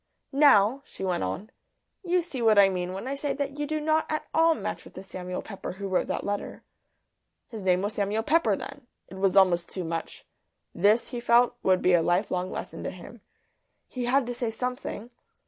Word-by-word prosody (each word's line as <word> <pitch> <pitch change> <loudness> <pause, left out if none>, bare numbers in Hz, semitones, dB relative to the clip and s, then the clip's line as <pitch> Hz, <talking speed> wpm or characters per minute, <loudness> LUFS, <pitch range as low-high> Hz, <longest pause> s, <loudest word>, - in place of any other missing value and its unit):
"Now," 270 -3 +5
she - - -9
went 180 - 0
on, 95 - -4 0.5
"you 360 -1 +1
see 275 -7 -6
what 220 -2 +4
I 200 -1 +7
mean 180 -1 -3
when 195 +6 -6
I 270 - -2
say 280 0 -2
that 280 0 -4
you 295 - -1
do 310 +1 -1
not 310 +1 +1
at 310 - -2
all 325 0 +4
match - - -5
with - - -15
the 185 - -8
Samuel 180 -1 -6
Pepper 195 -4 -7
who 200 +1 -5
wrote 185 -1 0
that - - -2
letter." 205 0 -4 0.9
His 225 -3 -7
name 185 0 +2
was 205 +1 -2
Samuel 210 +2 -1
Pepper 300 -8 +3
then! 260 +5 -9 0.2
It 190 - -9
was 195 0 +2
almost 175 -3 +4
too 185 - -4
much. 165 0 -5 0.5
This, 210 +6 +3
he 245 - -4
felt, 240 +1 +4
would 185 -1 +2
be 180 - +4
a 175 - +5
lifelong 180 +1 0
lesson - - -6
to - - -1
him. - - -11 0.7
He 250 -1 -4
had 260 +2 +2
to 245 - -3
say 240 -1 -2
something. 250 0 -5
215 Hz, 205 wpm, -27 LUFS, 185-270 Hz, 0.9 s, I